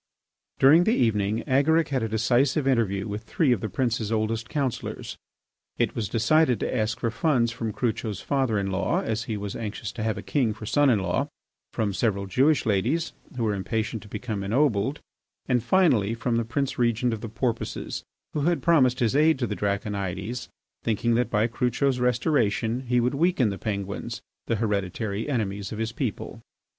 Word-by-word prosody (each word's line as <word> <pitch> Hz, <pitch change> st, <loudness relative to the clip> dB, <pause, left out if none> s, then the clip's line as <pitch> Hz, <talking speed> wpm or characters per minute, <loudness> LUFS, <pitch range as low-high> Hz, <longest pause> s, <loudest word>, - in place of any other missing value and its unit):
During 155 Hz, +6 st, +6 dB
the 225 Hz, -, +3 dB
evening 105 Hz, -2 st, +1 dB
Agaric 155 Hz, +4 st, +3 dB
had 135 Hz, -3 st, 0 dB
a 115 Hz, -, -1 dB
decisive 125 Hz, +6 st, +2 dB
interview 110 Hz, -6 st, +1 dB
with 105 Hz, +1 st, -4 dB
three 145 Hz, 0 st, +1 dB
of 115 Hz, -6 st, +1 dB
the 110 Hz, -, -3 dB
prince's 115 Hz, 0 st, -1 dB
oldest 110 Hz, +1 st, -1 dB
councillors. 140 Hz, -6 st, -3 dB, 0.6 s
It -, -, 0 dB
was 105 Hz, -4 st, -2 dB
decided 125 Hz, +2 st, +3 dB
to -, -, -1 dB
ask 110 Hz, 0 st, 0 dB
for 115 Hz, -1 st, -1 dB
funds 120 Hz, -2 st, +1 dB
from 115 Hz, -1 st, -3 dB
Crucho's 110 Hz, -3 st, -2 dB
father 135 Hz, -6 st, 0 dB
in 100 Hz, -1 st, -1 dB
law, 95 Hz, -, 0 dB
as 110 Hz, 0 st, -2 dB
he 110 Hz, -, -3 dB
was 100 Hz, -1 st, -5 dB
anxious 110 Hz, -1 st, -5 dB
to 115 Hz, -, -7 dB
have 110 Hz, 0 st, -1 dB
a -, -, -6 dB
king 120 Hz, -7 st, 0 dB
for 110 Hz, 0 st, -8 dB
son 145 Hz, +5 st, +3 dB
in 120 Hz, -, +4 dB
law, 95 Hz, -3 st, 0 dB, 0.4 s
from 105 Hz, -3 st, -1 dB
several 100 Hz, -1 st, 0 dB
Jewish 135 Hz, +10 st, +2 dB
ladies, 115 Hz, -, 0 dB, 0.2 s
who 120 Hz, -, -1 dB
were 110 Hz, -2 st, +1 dB
impatient 110 Hz, +3 st, -2 dB
to 105 Hz, -, -13 dB
become 105 Hz, -2 st, -4 dB
ennobled, 120 Hz, +3 st, +1 dB, 0.5 s
and, 125 Hz, -2 st, +2 dB
finally, 120 Hz, -, +3 dB
from 115 Hz, 0 st, -1 dB
the 115 Hz, -, 0 dB
Prince 135 Hz, +3 st, -2 dB
Regent 120 Hz, 0 st, +2 dB
of 110 Hz, -, -5 dB
the 115 Hz, -, -5 dB
Porpoises, 115 Hz, +1 st, -3 dB, 0.3 s
who -, -, -1 dB
had 170 Hz, +3 st, +1 dB
promised 135 Hz, -7 st, +4 dB
his 115 Hz, +1 st, +2 dB
aid 155 Hz, +1 st, +4 dB
to 125 Hz, -, -1 dB
the 105 Hz, -, -3 dB
Draconides, 100 Hz, +2 st, -3 dB, 0.3 s
thinking 115 Hz, +1 st, +1 dB
that 120 Hz, 0 st, +1 dB
by 105 Hz, -1 st, +2 dB
Crucho's 125 Hz, +3 st, 0 dB
restoration 120 Hz, -1 st, +1 dB
he 125 Hz, 0 st, +3 dB
would 125 Hz, +2 st, +1 dB
weaken 150 Hz, -5 st, +2 dB
the 100 Hz, -, -6 dB
Penguins, 100 Hz, -2 st, -4 dB, 0.2 s
the 115 Hz, -, +1 dB
hereditary 105 Hz, +1 st, -2 dB
enemies 100 Hz, -6 st, -2 dB
of 110 Hz, -, -5 dB
his 110 Hz, 0 st, -2 dB
people. 130 Hz, -, -4 dB
115 Hz, 185 wpm, -26 LUFS, 105-130 Hz, 0.6 s, During